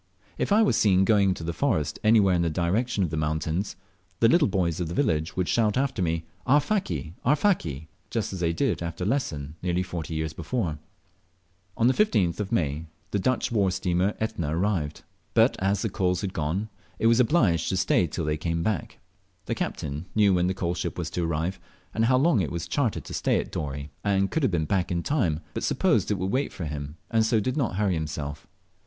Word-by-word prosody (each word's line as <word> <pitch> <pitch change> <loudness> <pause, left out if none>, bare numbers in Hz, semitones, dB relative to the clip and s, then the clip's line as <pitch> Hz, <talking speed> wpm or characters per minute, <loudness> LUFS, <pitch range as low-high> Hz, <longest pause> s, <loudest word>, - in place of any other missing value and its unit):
If - - -1
I 215 +2 +6
was 165 - +3
seem 95 -4 +4
going 100 -2 +4
into 90 -3 -2
the 85 +1 -2
forest 80 - 0
anywhere 110 -4 +5
in 85 - +2
the 85 - +1
direction 95 +7 0
of 85 - -1
the 80 - -2
mountains, 80 +5 -1 0.4
the 115 - +6
little 145 +4 +4
boys 90 -4 0
of 90 - -1
the 85 - -5
village 80 - 0
would 90 -2 +1
shout 110 -2 +2
after 135 -6 0
me, 80 -2 0 0.2
"Arfaki! 135 - +1
Arfaki?" 125 - +1 0.2
just 110 -4 -2
as 95 - -5
they 85 -1 +1
did 85 - 0
after 85 +1 -4
Lesson 75 - -2
nearly 90 0 0
forty 85 -3 -5
years 80 0 -2
before. 80 - -2 1.0
On 115 - +2
the 130 - +5
15th 105 - +2
of 105 0 -3
May 80 -6 -1 0.2
the 100 - 0
Dutch 130 +5 0
war 100 -4 +2
steamer 90 +2 0
Etna 85 -8 -2
arrived; 85 -6 -1 0.3
but, - - +5
as 95 +1 +1
the - - +1
coals 90 -3 0
had 95 -2 -3
gone, 85 +8 -2 0.3
it - - -2
was 115 +1 +5
obliged 110 - +3
to 95 - 0
stay 95 -1 +2
till 80 +1 -4
they 75 0 0
came 85 +1 -2
back. 100 -6 -2 0.5
The - - -1
captain 75 +4 -4
knew 105 -2 +5
when 90 0 +2
the 95 - -1
coalship 90 -1 -2
was 85 -2 -3
to 85 +1 -1
arrive, 85 +3 -2 0.3
and 115 - +2
how 130 +2 +4
long 135 - +3
it 80 - -2
was 85 0 -4
chartered 115 +4 -1
to - - -8
stay - - +1
at - - -5
Dorey, 70 -1 -4
and 100 -1 +1
could 160 - 0
have 135 - +2
been 80 -3 0
back 90 +2 0
in 85 -1 -1
time, 85 - 0
but - - -3
supposed - - +2
it 105 - +1
would 95 +1 -2
wait 135 +5 0
for 85 - -6
him, 75 +1 -5
and 115 -1 +3
so 110 0 +2
did 125 +5 -1
not 125 -11 0
hurry 100 -1 +1
himself. 75 -2 -4
90 Hz, 210 wpm, -26 LUFS, 80-110 Hz, 1.0 s, I